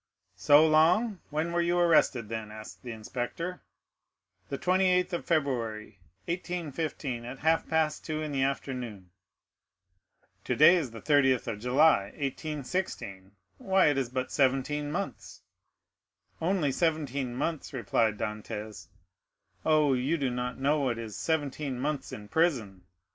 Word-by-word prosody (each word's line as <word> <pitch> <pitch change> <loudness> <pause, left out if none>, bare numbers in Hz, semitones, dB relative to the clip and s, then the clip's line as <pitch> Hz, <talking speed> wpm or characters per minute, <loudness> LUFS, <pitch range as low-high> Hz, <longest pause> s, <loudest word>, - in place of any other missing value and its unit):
"So 145 - +6
long?—when 165 0 +2
were 170 0 +1
you 175 +1 +1
arrested, 160 -9 +3
then?" 110 -1 -5
asked 110 0 -10
the 125 - -7
inspector. 125 +11 -5 0.9
"The 140 - -3
28th 180 +1 +2
of 175 - -3
February, 115 - -1 0.3
1815, 160 -7 -3
at 125 +3 -7
half 160 +3 +1
past 160 -1 +1
two 155 -1 -3
in 155 - -4
the 135 -2 -1
afternoon." 125 -8 -3 1.3
"Today 155 +5 +6
is 160 -8 -1
the 115 0 -10
30th 135 -4 +3
of 115 -3 -4
July, 125 -2 +4
1816,—why, 135 - -2
it 145 - 0
is 130 -3 -2
but 130 0 -3
seventeen 145 +2 +1
months." 195 +5 -5 1.0
"Only 170 -4 +1
seventeen 140 -5 -1
months," 160 +3 -3
replied 115 -4 0
Dantès. 105 0 -5 0.8
"Oh, 155 -3 +4
you 130 +6 0
do 135 -4 -1
not 125 0 -3
know 145 +3 +2
what 130 -4 0
is 110 -3 -6
seventeen 145 -4 -2
months 145 +2 -2
in 105 -1 -8
prison! 115 - 0
140 Hz, 125 wpm, -29 LUFS, 120-160 Hz, 1.3 s, So